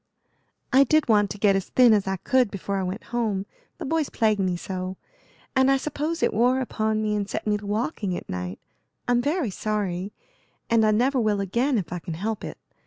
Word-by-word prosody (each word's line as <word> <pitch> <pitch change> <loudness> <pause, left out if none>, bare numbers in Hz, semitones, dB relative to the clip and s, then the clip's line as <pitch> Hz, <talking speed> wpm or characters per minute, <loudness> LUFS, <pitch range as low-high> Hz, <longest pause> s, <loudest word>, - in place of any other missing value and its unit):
"I 270 +2 +7
did 310 +3 +2
want 205 -3 +4
to 205 - -6
get 200 -1 +3
as 195 - -2
thin 245 -3 +6
as 205 -2 +1
I 190 - 0
could 255 +4 +2
before 200 0 -3
I - - 0
went 185 +4 -4
home, 215 -5 0 0.3
the - - -6
boys 315 +1 0
plague 215 -3 +1
me 185 -2 0
so; 185 +1 -5 0.6
and 265 0 +4
I 270 - +4
suppose 305 +4 -3
it - - +2
wore 245 +4 +3
upon 220 -3 -1
me 210 -1 0
and 205 -1 -2
set - - -4
me 210 -1 +2
to 205 0 -9
walking 210 - -2
at - - -9
night. 90 0 -4 0.5
I'm 245 0 +3
very 290 - 0
sorry, 200 -2 -2 0.6
and 230 -1 +5
I 215 - +4
never 250 +5 +2
will 215 -3 +1
again 235 +8 +1
if 180 -4 -3
I 180 - -3
can 165 -1 -6
help 215 +5 -3
it. - - -6
215 Hz, 215 wpm, -25 LUFS, 195-250 Hz, 0.6 s, I